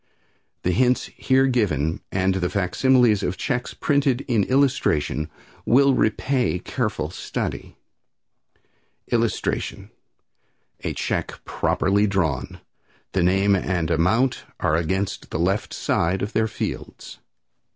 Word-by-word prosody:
The 90 - +1
hints 125 +5 +1
here 130 0 +3
given 85 - 0
and 95 0 +1
the 90 -2 -1
facsimiles 115 +3 +3
of 90 0 -2
checks 125 +4 -2
printed 140 -3 +1
in 115 -6 +1
illustration 125 - +1 0.3
will 140 +2 +4
repay 125 -1 +1
careful 95 -7 -3
study. - - -5 1.3
[Illustration: - - -1 0.9
A - - -2
Check - - -3
Properly 100 +3 +1
Drawn. 85 -10 -1 0.5
The 95 - +1
name 95 +3 +3
and 90 -3 -1
amount 95 +11 +2 0.2
are 75 - +1
against 95 +4 -2
the - - -3
left 95 +5 0
side 90 +3 0
of 105 - -4
their 110 0 +2
fields. - - -6
100 Hz, 110 wpm, -23 LUFS, 90-125 Hz, 1.3 s, will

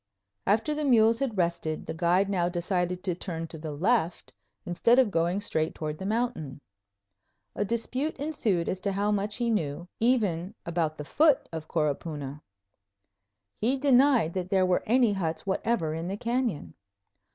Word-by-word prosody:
After 220 +9 +2
the 300 0 -2
mules 230 -4 +4
had 260 -7 -2
rested, 170 -3 -1
the - - -4
guide 175 +4 +2
now 180 -3 +1
decided 180 0 -1
to 185 - 0
turn 165 -2 -5
to 160 - -7
the 155 0 -5
left 175 +3 0 0.3
instead 230 +8 +3
of 255 -6 +4
going 170 +3 +1
straight 160 -5 -1
toward 155 -1 -4
the 190 - -4
mountain. 215 - -2 1.0
A - - 0
dispute 245 +7 -2
ensued 230 - -1
as 185 - -2
to 200 +1 -1
how 205 +2 +1
much 205 0 -1
he 235 -1 0
knew, 170 -4 -2
even 210 -6 +1
about 165 -2 -1
the 150 - -6
foot 295 - +3
of 160 -1 -5
Coropuna. 150 -2 -2 1.2
He 250 +5 +1
denied 260 - +4
that 185 -1 -3
there 190 -1 +3
were 180 -1 +2
any 240 -1 +4
huts 165 -3 -3
whatever 190 -4 0
in 165 +2 -4
the 195 +2 -3
canyon. 235 - -2
190 Hz, 165 wpm, -28 LUFS, 165-230 Hz, 1.2 s, mules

